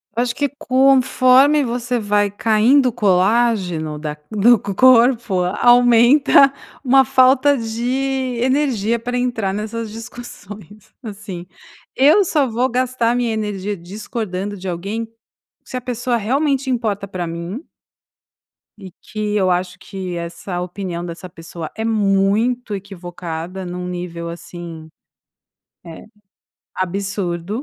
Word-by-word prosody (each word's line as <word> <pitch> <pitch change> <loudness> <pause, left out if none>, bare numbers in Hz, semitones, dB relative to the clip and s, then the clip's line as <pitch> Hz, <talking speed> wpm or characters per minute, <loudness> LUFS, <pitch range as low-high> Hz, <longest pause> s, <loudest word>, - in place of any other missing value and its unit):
Eu 235 - +1
acho 240 -1 -3
que 285 - 0
conforme 265 +2 +4
você 245 0 -2
vai 205 -1 +1
caindo 230 +6 +3
o - - +1
colágeno 190 -6 +1
da 150 -1 -5 0.2
do 230 +3 +5
co 200 0 -5
corpo, 235 -4 +4
aumenta 245 +7 +5 0.3
uma 270 0 +5
falta 260 +2 +4
de 255 +2 -2
energia 250 -4 +1
para 245 +2 -4
entrar 235 -6 -1
nessas 215 +2 -4
discussões, 215 -3 -11
assim, 200 -5 -8 0.5
eu 295 +10 +5
só 300 -6 +1
vou 245 +2 0
gastar 250 -1 0
a - - 0
minha 240 -2 0
energia 210 -2 -3
discordando 200 +1 -5
de 190 0 -8
alguém, 200 +6 -4 0.6
se - - -7
a 250 - -2
pessoa 245 0 -2
realmente 270 +4 0
importa 215 -5 -1
para 180 -2 -5
mim 170 - -6 1.1
e 190 -3 -11
que 210 -1 -4
eu 190 -3 +2
acho 180 0 -2
que 185 -3 -6
essa 170 +2 -5
opinião 180 -1 -5
dessa 175 +2 -8
pessoa 165 -2 -9
é 220 - -3
muito 215 +2 +1
equivocada, 180 -2 -7
num 180 0 -5
nível, 175 -1 -5
assim, 170 -1 -9 1.0
eh, 165 - -10 0.7
absurdo, 195 +2 -3
215 Hz, 125 wpm, -19 LUFS, 185-245 Hz, 1.1 s, do